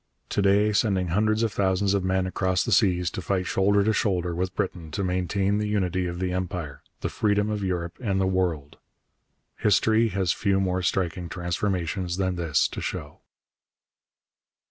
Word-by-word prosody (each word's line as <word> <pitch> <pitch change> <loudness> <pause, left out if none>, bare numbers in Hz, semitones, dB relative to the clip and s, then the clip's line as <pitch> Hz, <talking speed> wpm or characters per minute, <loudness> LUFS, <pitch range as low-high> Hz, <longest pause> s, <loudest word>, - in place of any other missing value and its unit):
To - - 0
day, 100 +2 +3
sending 95 -5 +1
hundreds 110 +5 +2
of 110 -3 0
thousands 95 0 +1
of 100 -2 +1
men 95 0 +1
across 95 0 0
the 120 - -3
seas 90 -4 +3
to - - -5
fight 90 +1 -1
shoulder 100 +2 +2
to 110 +2 +2
shoulder 90 -5 0
with 90 +2 -3
Britain 85 -3 -3
to 90 +6 -3
maintain 95 +2 0
the 105 - -1
unity 95 -3 0
of 85 0 -5
the 90 0 -1
Empire, 90 -5 -4 0.2
the - - -1
freedom 105 0 +1
of 105 -1 -2
Europe 90 -2 -3
and 100 -5 0
the 95 - +2
world! 90 -6 -1 0.8
History 110 +2 +3
has 95 -5 0
few 100 0 +1
more 95 -1 0
striking 90 -1 -1
transformations 90 0 -2
than 95 -1 0
this 85 -5 +1
to - - -6
show. - - -5
95 Hz, 170 wpm, -25 LUFS, 90-100 Hz, 0.8 s, day